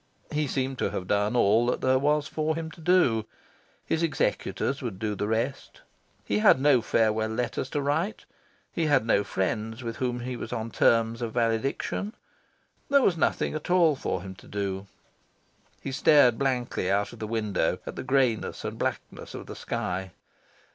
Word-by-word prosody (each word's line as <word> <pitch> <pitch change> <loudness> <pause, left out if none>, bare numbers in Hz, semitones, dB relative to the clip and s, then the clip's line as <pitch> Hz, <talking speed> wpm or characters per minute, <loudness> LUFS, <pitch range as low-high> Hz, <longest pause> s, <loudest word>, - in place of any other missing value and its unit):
He 150 0 0
seemed 130 0 -2
to - - +1
have 90 - -4
done 105 +4 +1
all 115 +1 +4
that 125 - 0
there 130 0 +3
was 145 +1 +1
for 155 0 -1
him 160 -1 -5
to 165 - -14
do. 145 -11 +3 0.6
His 160 - 0
executors 145 -3 -1
would 115 -7 -4
do 105 +1 -2
the 105 +1 -2
rest. 115 +5 -2 0.4
He 105 - 0
had 120 - +6
no 135 -3 +4
farewell 110 -1 +1
letters 125 +3 -2
to 145 - -1
write. 160 +9 -1 0.5
He 165 -2 0
had 135 -6 +3
no 100 -3 +3
friends 110 +5 -2
with 115 -1 -4
whom 125 -2 -2
he 125 +1 -4
was - - -6
on 115 -1 -3
terms 115 0 +2
of 115 -2 -3
valediction. 120 - -1 0.7
There 280 -1 +5
was 180 - +3
nothing 160 - 0
at 155 +2 -5
all 170 -4 +4
for 95 -8 -3
him 95 -1 -7
to - - -15
do. 100 -1 -3 1.0
He 135 - -3
stared 130 -3 +5
blankly 125 -8 -1
out 100 +1 0
of - - -12
the 110 - -4
window, 105 -6 0
at - - -6
the - - -4
greyness 130 -4 0
and - - -5
blackness - - -4
of - - -7
the - - -8
sky. 90 -1 -3
120 Hz, 180 wpm, -27 LUFS, 110-145 Hz, 1.0 s, had